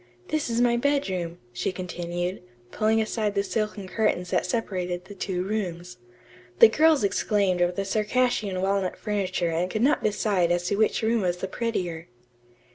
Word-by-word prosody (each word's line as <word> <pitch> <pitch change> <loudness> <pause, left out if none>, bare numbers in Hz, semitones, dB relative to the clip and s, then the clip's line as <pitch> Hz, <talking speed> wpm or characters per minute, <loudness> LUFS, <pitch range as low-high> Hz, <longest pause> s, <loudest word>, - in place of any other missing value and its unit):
This 310 -4 -1
is 230 0 0
my 240 -1 +3
bedroom," 190 -11 -1 0.2
she 120 - -1
continued, 175 0 -4 0.3
pushing 220 +1 +2
aside 215 -1 -1
the 200 - +2
silken 205 0 -3
curtains 185 -3 0
that - - +1
separated 180 -4 -2
the 205 - -10
two 185 -2 -3
rooms. 180 - -4 0.6
The 220 - +9
girls 310 +1 +4
exclaimed 200 -2 +1
over 175 0 +3
the 195 +2 -2
Circassian 210 -2 0
walnut 195 -1 0
furniture 185 -5 -1
and 170 +3 0
could 215 +4 -1
not 290 +3 +3
decide 200 -4 +1
as 175 0 0
to 200 - +1
which 220 +2 +1
room 225 0 +2
was 180 -2 0
the 190 - -4
prettier. 180 -7 -3
195 Hz, 165 wpm, -26 LUFS, 180-220 Hz, 0.6 s, The